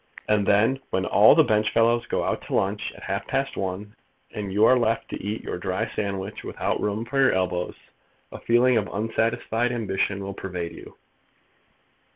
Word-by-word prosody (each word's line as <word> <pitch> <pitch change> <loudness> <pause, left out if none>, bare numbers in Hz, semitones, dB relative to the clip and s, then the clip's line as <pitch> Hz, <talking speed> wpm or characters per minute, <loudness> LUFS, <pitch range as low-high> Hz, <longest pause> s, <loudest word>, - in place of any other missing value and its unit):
And 105 -2 +2
then, 110 +6 +3
when 95 0 -1
all 105 +7 +6
the 160 - +6
benchfellows 115 +1 +2
go - - -1
out - - -1
to - - -2
lunch 100 +2 -1
at - - -13
half 100 0 -3
past 135 0 -1
one, 100 +3 -4 0.4
and 100 -2 -5
you 105 +3 +4
are 130 - +6
left 115 -2 0
to - - -6
eat 105 +2 -4
your - - -5
dry 95 0 -2
sandwich 100 0 -4
without - - -2
room 105 +2 -2
for 135 +3 -2
your 135 - +4
elbows, 90 -1 -1 0.6
a - - -8
feeling 120 +1 +3
of 105 -2 -1
unsatisfied 115 +2 -1
ambition 100 -4 -1
will 100 0 -5
pervade 90 -3 -5
you. - - -13
105 Hz, 180 wpm, -24 LUFS, 100-115 Hz, 0.6 s, all